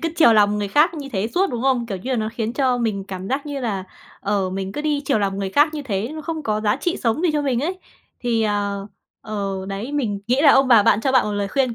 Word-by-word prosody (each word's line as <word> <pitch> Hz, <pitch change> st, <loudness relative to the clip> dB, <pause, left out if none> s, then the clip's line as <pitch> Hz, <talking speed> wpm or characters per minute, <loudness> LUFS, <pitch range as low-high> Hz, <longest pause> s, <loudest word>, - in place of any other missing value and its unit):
cứ 330 Hz, -, -1 dB
chiều 310 Hz, -9 st, +6 dB
lòng 210 Hz, -1 st, +4 dB
người 205 Hz, -1 st, -2 dB
khác 300 Hz, -, +3 dB
như 290 Hz, -3 st, -6 dB
thế 200 Hz, +1 st, -1 dB
suốt, 375 Hz, 0 st, +2 dB
đúng 240 Hz, -2 st, -3 dB
không? 260 Hz, -3 st, +1 dB
Kiểu 200 Hz, -4 st, -4 dB
như 245 Hz, +9 st, -6 dB
là 255 Hz, -, +1 dB
nó 220 Hz, -1 st, -1 dB
khiến 230 Hz, -1 st, -3 dB
cho 255 Hz, -2 st, +1 dB
mình 215 Hz, -4 st, -1 dB
cảm 190 Hz, 0 st, -6 dB
giác 275 Hz, +3 st, -2 dB
như 285 Hz, -2 st, -4 dB
là, 205 Hz, -6 st, -2 dB, 0.4 s
ờ, 200 Hz, -2 st, -1 dB
mình 190 Hz, 0 st, -4 dB
cứ 295 Hz, -, -4 dB
đi 295 Hz, -1 st, -1 dB
chiều 270 Hz, -4 st, +2 dB
lòng 195 Hz, -1 st, -1 dB
người 195 Hz, -1 st, -2 dB
khác 295 Hz, +8 st, +3 dB
như 300 Hz, -, -4 dB
thế, 215 Hz, -4 st, -2 dB
nó 315 Hz, -, -6 dB
không 320 Hz, -1 st, -4 dB
có 215 Hz, -3 st, -1 dB
giá 210 Hz, +1 st, +1 dB
trị 345 Hz, +5 st, -1 dB
sống 230 Hz, +6 st, -1 dB
gì 360 Hz, -, +3 dB
cho 295 Hz, -1 st, 0 dB
mình 255 Hz, -4 st, 0 dB
ấy. 360 Hz, +6 st, -2 dB, 0.4 s
Thì, 230 Hz, -2 st, 0 dB
ờ, 205 Hz, -1 st, -1 dB, 0.3 s
ờ, 195 Hz, -3 st, -4 dB
đấy, 205 Hz, +8 st, -5 dB
mình 215 Hz, -9 st, -1 dB
nghĩ 250 Hz, +4 st, +2 dB
là 290 Hz, -, +8 dB
ông 270 Hz, -1 st, +4 dB
bà 230 Hz, -4 st, +7 dB
bạn 205 Hz, -, +3 dB
cho 265 Hz, +3 st, 0 dB
bạn 260 Hz, -4 st, +4 dB
một 210 Hz, -, -2 dB
lời 205 Hz, -1 st, -2 dB
khuyên 255 Hz, 0 st, 0 dB
230 Hz, 285 wpm, -21 LUFS, 205-280 Hz, 0.4 s, là